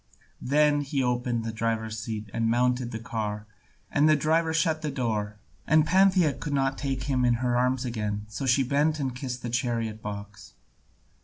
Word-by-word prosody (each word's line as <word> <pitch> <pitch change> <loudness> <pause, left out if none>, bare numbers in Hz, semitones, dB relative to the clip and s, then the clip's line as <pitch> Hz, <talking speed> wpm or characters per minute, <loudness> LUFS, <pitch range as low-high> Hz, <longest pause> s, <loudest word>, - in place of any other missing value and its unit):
Then 145 +2 +3
he 140 -1 -1
opened 125 -1 0
the 115 - -2
driver's 110 -1 -2
seat 110 -1 -5
and 115 -1 0
mounted 125 +1 +1
the 110 - -5
car, 110 -2 -4 0.5
and 150 +2 +4
the 155 - +6
driver 160 +2 +1
shut 160 0 +1
the 155 - -2
door, 110 -6 -2 0.3
and 155 0 +5
Pantheia 185 -3 +4
could 150 +1 -5
not 135 -1 +1
take 135 -3 -3
him 130 -1 0
in 120 -1 +3
her 120 0 0
arms 125 +1 +1
again, 105 -3 -3
so 135 +5 -5
she 130 +2 +4
bent 150 +4 +1
and 130 -3 -2
kissed 125 -1 -5
the 120 - -3
chariot 115 -3 -1
box. 105 -1 -8
125 Hz, 180 wpm, -27 LUFS, 115-145 Hz, 0.5 s, the